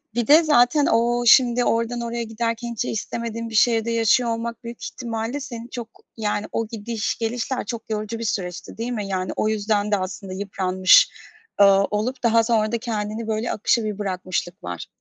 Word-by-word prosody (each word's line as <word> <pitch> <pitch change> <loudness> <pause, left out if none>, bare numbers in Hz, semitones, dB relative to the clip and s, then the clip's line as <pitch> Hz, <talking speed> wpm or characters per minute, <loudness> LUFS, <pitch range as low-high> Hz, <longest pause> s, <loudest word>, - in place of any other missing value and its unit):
Bir 240 -2 0
de 315 +3 +7
zaten 290 0 +4
o 240 +1 +2
şimdi 245 +1 +5
oradan 230 +1 0
oraya 235 0 -3
giderken, 230 +1 -3
hiç 235 +1 -3
istemediğin 230 +1 -4
bir 220 - -7
şehirde 230 +1 +3
yaşıyor 230 +1 +3
olmak 230 0 -4
büyük 235 -1 -8
ihtimalle 230 +3 -4
seni 240 -4 -8
çok, 235 -2 -6 0.3
yani, 210 -1 -1
o 225 - -2
gidiş 220 0 -3
gelişler 240 +3 -2
çok 230 -2 -6
yorucu 215 +1 -3
bir - - -4
süreçti, 180 -5 -4
değil 230 +2 -3
mi? 210 -4 -3
Yani 185 -1 -2
o - - 0
yüzden 210 -1 0
de 205 - +3
aslında 185 0 -5
yıpranmış, 185 -1 +4 0.5
eee, 200 - +8 0.3
olup 240 +5 -2
daha 230 -1 +4
sonra 220 -2 +1
da 235 - 0
kendini 220 -1 -4
böyle 220 +2 -1
akışa 225 +2 +1
bir 210 -1 -4
bırakmışlık 185 -3 -3
var. 90 -2 -6
225 Hz, 180 wpm, -23 LUFS, 210-235 Hz, 0.5 s, eee